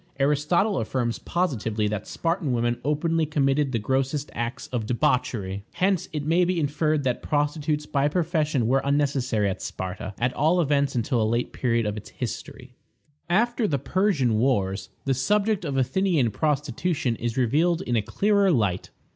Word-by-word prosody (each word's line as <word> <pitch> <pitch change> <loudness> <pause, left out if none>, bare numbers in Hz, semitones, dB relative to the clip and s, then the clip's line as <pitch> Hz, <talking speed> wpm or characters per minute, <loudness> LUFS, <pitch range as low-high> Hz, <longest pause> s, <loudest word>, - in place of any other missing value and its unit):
Aristotle 150 - +2
affirms 120 +1 -2
positively 115 - -1
that 105 0 -3
the - - -12
Spartan 165 -5 -1
women 120 0 0
openly 155 +3 +1
committed 140 -1 +1
the 120 - 0
grossest 135 +5 -1
acts 120 +1 -4
of 115 -4 -3
debauchery. 115 -5 0
Hence 185 -1 +1
it 150 -3 -3
may 170 +3 +3
be 180 0 +1
inferred 150 0 0
that 125 -2 -1
prostitutes 150 0 -1
by 140 -1 +1
profession 155 -5 0
were 135 +4 +2
unnecessary 135 -6 +1
at 95 - -3
Sparta, 95 +2 -5
at 120 +1 0
all 165 +4 +2
events 140 -4 +1
until 120 0 +1
a - - +3
late 120 +1 -1
period 115 -2 0
of 105 0 -2
its 105 - -8
history. 125 +1 -7 0.6
After 235 +4 +2
the 145 - 0
Persian 140 - +1
wars, 100 -6 0 0.2
the 135 - +2
subject 205 - +1
of 140 -4 -2
Athenian 145 - +2
prostitution 145 - -1
is 120 +1 -3
revealed 160 +8 +2
in 120 - -1
a 110 - +3
clearer 200 - +2
light. 105 - +1
140 Hz, 165 wpm, -25 LUFS, 120-160 Hz, 0.6 s, may